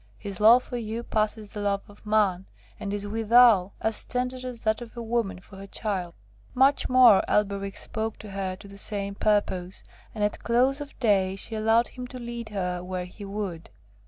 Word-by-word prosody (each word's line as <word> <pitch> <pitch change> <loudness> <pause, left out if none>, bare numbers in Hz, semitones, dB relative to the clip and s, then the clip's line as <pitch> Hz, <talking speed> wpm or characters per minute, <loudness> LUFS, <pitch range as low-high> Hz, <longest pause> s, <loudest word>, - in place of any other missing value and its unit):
'His 200 -3 -7
love 230 +4 +7
for 245 - -5
you 225 0 -4
passes 215 -2 -1
the 210 - -6
love 200 -1 0
of 205 +1 -17
man, 200 -4 +2 0.3
and 200 - -4
is 205 0 -2
withal 225 -2 +4
as 220 -1 +3
tender 250 0 -2
as 245 -2 -7
that 220 +1 0
of 240 0 -10
a - - -4
woman 225 -5 -1
for 190 +1 -15
her 195 +1 -9
child.' 190 -5 -3 0.4
Much 270 +3 +3
more 250 -5 +7
Elberich 200 -1 0
spake 220 0 -3
to 210 - -10
her 190 -1 -3
to 195 - -13
the 200 0 -10
same 200 -1 -2
purpose, 195 -3 0 0.3
and 210 - -2
at 210 - -1
close 255 +4 +2
of 290 - -9
day 195 -5 +2
she 195 - -5
allowed 225 +2 +2
him 250 -1 -8
to 255 - -9
lead 235 -2 -6
her 180 -3 -3
where 180 0 -4
he 185 +4 -11
would. 195 -4 -5
210 Hz, 195 wpm, -26 LUFS, 195-235 Hz, 0.4 s, love